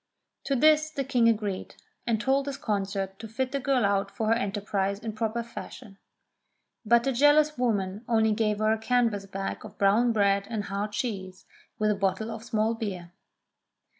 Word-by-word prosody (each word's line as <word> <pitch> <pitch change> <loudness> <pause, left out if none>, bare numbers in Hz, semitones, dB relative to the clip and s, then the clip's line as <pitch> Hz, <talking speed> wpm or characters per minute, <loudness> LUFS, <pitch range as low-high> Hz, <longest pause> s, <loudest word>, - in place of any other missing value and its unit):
To 275 - +1
this 310 +3 +4
the 280 -3 -3
King 245 -4 +3
agreed, 210 -4 -2 0.3
and 225 -2 +1
told 270 +4 +1
his 280 -1 -3
consort 195 -2 -2
to 225 - -7
fit 255 +4 -2
the 280 - -1
girl 260 -4 +1
out 200 0 +1
for 220 +1 -2
her - - +5
enterprise 200 -3 -1
in 220 0 -6
proper 225 +1 -2
fashion. 225 -3 -10 0.8
But 235 +1 +4
the 270 - +1
jealous 295 +4 +4
woman 205 -4 -1
only 220 -2 +3
gave 210 -1 +1
her 215 +1 +2
a 220 - -2
canvas 225 -4 +1
bag 195 0 -5
of 215 - -11
brown 215 +5 +3
bread 200 -2 +2
and 220 -3 -2
hard 200 +2 -3
cheese, 190 -5 -4 0.3
with 215 -1 +2
a - - +1
bottle 195 +3 -1
of 220 - -7
small 225 -1 0
beer. 190 -7 -5
220 Hz, 180 wpm, -27 LUFS, 200-240 Hz, 0.8 s, her